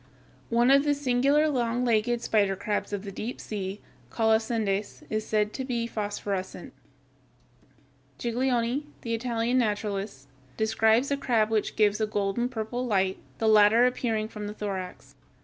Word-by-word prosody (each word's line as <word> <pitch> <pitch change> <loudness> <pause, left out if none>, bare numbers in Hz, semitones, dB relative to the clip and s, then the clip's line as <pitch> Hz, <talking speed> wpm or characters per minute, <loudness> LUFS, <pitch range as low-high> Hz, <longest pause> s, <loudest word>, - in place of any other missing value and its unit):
One 240 +2 +4
of 275 0 +6
the 290 -1 +2
singular 280 +3 +2
long 245 -3 0
legged 235 +1 +1
spider 200 -3 +2
crabs 205 +2 -2
of 205 -1 -3
the 200 - -6
deep 225 +5 -5
sea, 200 -1 -5 0.3
Colossendeis, 220 - 0
is 215 0 -2
said 210 -1 +1
to 265 - -4
be 240 -3 -2
phosphorescent. 205 -3 -4 1.4
Giglioli, 245 +2 0 0.2
the 230 - -2
Italian 235 +1 0
naturalist, 205 - -2 0.3
describes 220 +4 +2
a 280 - +1
crab 225 -5 +1
which 215 -2 0
gives 210 0 +2
a 215 - +1
golden 210 +4 -1
purple 240 +1 -3
light, 190 -5 0 0.2
the 225 - 0
latter 215 +2 +6
appearing 225 -3 0
from 210 -2 -7
the 210 - -6
thorax. 190 -4 -6
220 Hz, 145 wpm, -27 LUFS, 210-245 Hz, 1.4 s, of